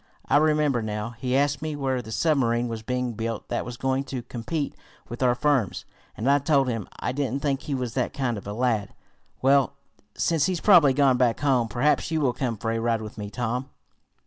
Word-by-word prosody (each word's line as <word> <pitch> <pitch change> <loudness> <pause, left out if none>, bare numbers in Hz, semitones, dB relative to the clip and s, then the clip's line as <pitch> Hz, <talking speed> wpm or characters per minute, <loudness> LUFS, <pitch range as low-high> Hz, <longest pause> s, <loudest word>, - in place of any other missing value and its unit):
I - - +3
remember 150 -4 +2
now 105 +1 -3
he 125 +2 -1
asked 145 0 +1
me 155 -1 -3
where 135 -3 -1
the 110 - -10
submarine 120 -2 +1
was 115 -1 -5
being 125 +1 -2
built 115 0 -4
that - - -2
was 125 -1 -7
going 135 +1 0
to 130 -3 -5
compete 140 +6 -3 0.4
with 120 +1 -7
our 125 -1 +3
firm's, 135 -7 0 0.3
and 115 - -2
I 140 +1 +5
told 140 -2 +2
him. 115 -5 -3
I - - -1
didn't 135 0 -2
think 140 -2 0
he 145 - -3
was 125 -3 -3
that 125 - -1
kind 130 -4 -1
of 100 -1 -8
a 105 - -4
lad. 110 -3 -1 0.5
Well, 135 0 +4 0.4
since 165 -1 +1
he's 185 -2 -1
probably 165 -10 +6
gone 135 -2 +4
back 125 -2 +2
home, 130 -5 +2
perhaps 125 +11 +1
you 160 -1 0
will 135 -5 +1
come 120 -4 -2
for 115 +2 -2
a 115 - -1
ride 115 -1 0
with 110 0 -9
me, 105 -1 -5
Tom." 125 +4 -3
125 Hz, 215 wpm, -25 LUFS, 115-140 Hz, 0.5 s, probably